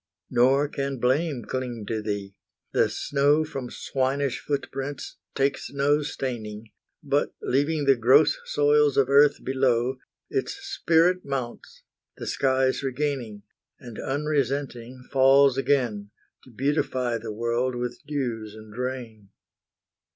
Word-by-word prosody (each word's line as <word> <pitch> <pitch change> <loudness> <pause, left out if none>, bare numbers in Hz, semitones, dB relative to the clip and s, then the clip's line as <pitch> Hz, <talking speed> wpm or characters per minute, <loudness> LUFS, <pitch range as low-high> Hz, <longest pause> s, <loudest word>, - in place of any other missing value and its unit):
Nor 130 +4 +4
can 140 -1 -3
blame 130 +2 0
cling 125 -4 -4
to 110 +1 -2
thee; 100 -2 -4 0.4
the - - +3
snow 145 +2 +2
From 135 -5 -6
swinish 135 -1 -1
foot 145 -1 -2
prints 135 +1 -5 0.2
takes 140 +1 0
no 140 +2 +2
staining, 115 -7 -5 0.3
But, - - 0
leaving 145 +3 0
the 135 -1 +6
gross 130 +6 +5
soils 145 -1 +3
of 135 -1 +3
earth 140 +1 +5
below, 130 -1 +1 0.3
Its 400 - -2
spirit 185 - +1
mounts, 130 -4 -5 0.3
the - - -6
skies 130 -1 +1
regaining, 130 -6 -3 0.4
And 120 -4 -10
unresenting 135 -3 -2
falls 135 0 +5
again, 125 -7 0 0.4
To - - -15
beautify 125 -2 -1
the 110 0 -6
world 120 +3 -1
with 120 0 -4
dews 115 -7 -3
and 110 -1 -12
rain. 120 -5 -5
130 Hz, 120 wpm, -25 LUFS, 120-140 Hz, 0.4 s, the